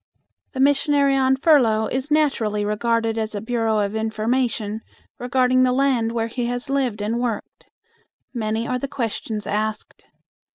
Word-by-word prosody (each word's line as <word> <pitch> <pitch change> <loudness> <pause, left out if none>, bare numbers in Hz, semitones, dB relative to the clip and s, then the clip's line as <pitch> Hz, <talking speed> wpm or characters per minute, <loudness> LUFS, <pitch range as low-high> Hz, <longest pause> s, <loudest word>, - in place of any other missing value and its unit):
The 260 - -5
missionary 280 0 +3
on 265 0 +3
furlough 250 -7 +3
is 260 +5 -3
naturally 235 -9 +1
regarded 225 +1 0
as 220 -1 -3
a - - -2
bureau 225 0 0
of 205 0 -1
information 220 0 -1 0.4
regarding 255 +1 +2
the 255 0 +4
land 255 -3 +1
where 225 -1 0
he 235 +1 -3
has 245 +2 -4
lived 250 -7 -1
and 225 +3 -1
worked. 235 -4 -4 0.7
Many 225 -1 -2
are 250 - -1
the 275 - -3
questions 225 -5 -4
asked. 215 +1 -4
235 Hz, 150 wpm, -22 LUFS, 220-260 Hz, 0.7 s, the